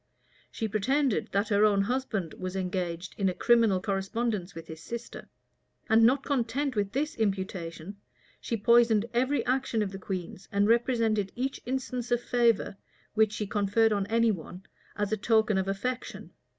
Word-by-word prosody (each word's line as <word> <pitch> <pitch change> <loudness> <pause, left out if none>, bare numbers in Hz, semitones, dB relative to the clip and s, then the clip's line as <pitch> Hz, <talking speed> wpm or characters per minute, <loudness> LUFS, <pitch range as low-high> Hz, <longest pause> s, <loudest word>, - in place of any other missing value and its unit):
She 225 - -3
pretended 255 +4 0
that 200 +2 0
her 205 0 +3
own 205 -2 +4
husband 220 -7 -2
was 185 0 -6
engaged 180 -2 -3
in 195 -1 +2
a 180 - -3
criminal 230 -5 +4
correspondence 195 0 -2
with 165 0 -8
his 160 -1 -10
sister; 235 +6 -7 0.6
and 225 +1 +5
not 255 +4 +4
content 270 0 -1
with 200 -2 0
this 295 +4 -1
imputation, 190 -3 -3 0.4
she 230 - -3
poisoned 230 -1 +4
every 260 +4 +1
action 255 -3 0
of 195 - -4
the 195 - -7
queen's, 185 -1 -6
and 200 +1 +2
represented 230 -4 +2
each 265 +2 -3
instance 255 -2 -3
of 240 - +2
favor, 235 -4 +1 0.4
which 220 -1 +3
she 215 - -3
conferred 205 +2 +2
on 200 -1 -1
any 230 +1 +3
one, 180 0 -7 0.3
as 205 -1 -2
a 220 - +1
token 220 -1 +2
of 190 - -2
affection. 245 +6 -4
215 Hz, 165 wpm, -28 LUFS, 195-240 Hz, 0.6 s, and